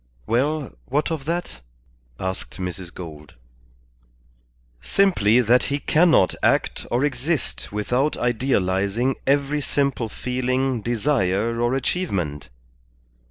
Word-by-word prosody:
"Well, 140 +5 0 0.2
what 145 +5 0
of 155 -4 -3
that?" 170 - -3 0.6
asked 95 0 -4
Mrs. 90 -1 -5
Gould. 75 -5 -10 1.5
"Simply 125 - +3
that 125 +2 +3
he 140 - -1
cannot 155 - +4
act - - +1
or 125 +4 +2
exist 130 - -2
without 125 +8 0
idealizing 115 -1 0
every 140 +1 +2
simple 140 -5 0
feeling, 130 +1 -1
desire, 115 -2 0
or 120 +2 +2
achievement. 95 - -2
125 Hz, 100 wpm, -23 LUFS, 100-140 Hz, 1.5 s, cannot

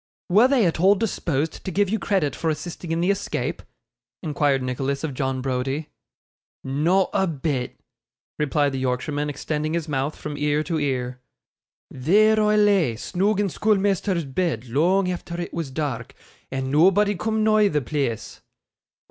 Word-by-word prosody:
'Were 210 +7 +6
they 260 -6 +3
at 165 -2 0
all 195 +4 +5
disposed 165 -8 -2
to - - -4
give 200 +3 +1
you 220 +3 -1
credit 190 -9 0
for 165 - -1
assisting 160 +2 -5
in 165 +1 0
the 180 +3 +3
escape?' 195 - -3 0.6
inquired 145 -3 +1
Nicholas 135 +3 -2
of 155 -4 -2
John 130 0 -2
Browdie. 135 +3 -2 0.7
'Not 165 +8 +1
a 190 - +2
bit,' 140 -5 -3 0.6
replied 145 -1 +1
the 135 - -3
Yorkshireman, 145 +3 -1
extending 150 +2 -2
his 165 -2 -2
mouth 140 0 -1
from 150 -1 -6
ear 150 +1 +1
to 160 +1 -2
ear. 125 -3 -2 0.7
'There 215 +11 +3
I 210 0 +3
lay, 200 - +3
snoog 195 - 0
in 205 - +2
schoolmeasther's 195 -3 +1
bed 135 -4 -2
long 175 +10 +2
efther 175 -1 -4
it 175 - -5
was 165 -4 -3
dark, 130 -4 -4 0.3
and 135 0 -3
nobody 195 +7 +4
coom 220 +2 -1
nigh 215 -1 +4
the 150 -6 0
pleace. 125 -5 -3
155 Hz, 155 wpm, -23 LUFS, 135-190 Hz, 0.7 s, Were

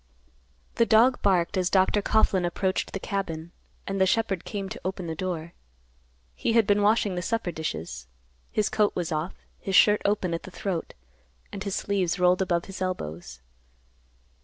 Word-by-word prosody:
The 230 - +5
dog 240 +3 +5
barked 190 -1 +2
as 185 -1 +1
Dr. 190 +2 +3
Coughlan 200 -3 +2
approached 185 +2 -1
the 195 - -3
cabin, 170 -5 -4 0.3
and 195 -1 -2
the 190 - +5
shepherd 195 -3 0
came 200 -3 -4
to - - -7
the - - -4
open 180 -3 -4
door. 170 -1 -4 0.8
He 225 - -1
had 230 -2 +5
been 205 0 +3
washing 205 -1 +3
the 180 - -2
supper 205 0 -1
dishes. 80 - -5 0.4
His 215 - +1
coat 210 -1 +1
was 175 -1 -2
off, 155 +3 -2 0.2
his 195 - -2
shirt 210 +2 +6
open 200 -4 0
at 165 - -2
the - - -10
throat, 185 -2 -4 0.6
and 200 - -5
his 200 -2 -2
sleeves 195 -3 0
rolled 180 +1 +3
above 175 -2 0
his 195 -1 -9
elbows. 80 - -4
185 Hz, 170 wpm, -26 LUFS, 170-200 Hz, 0.8 s, shirt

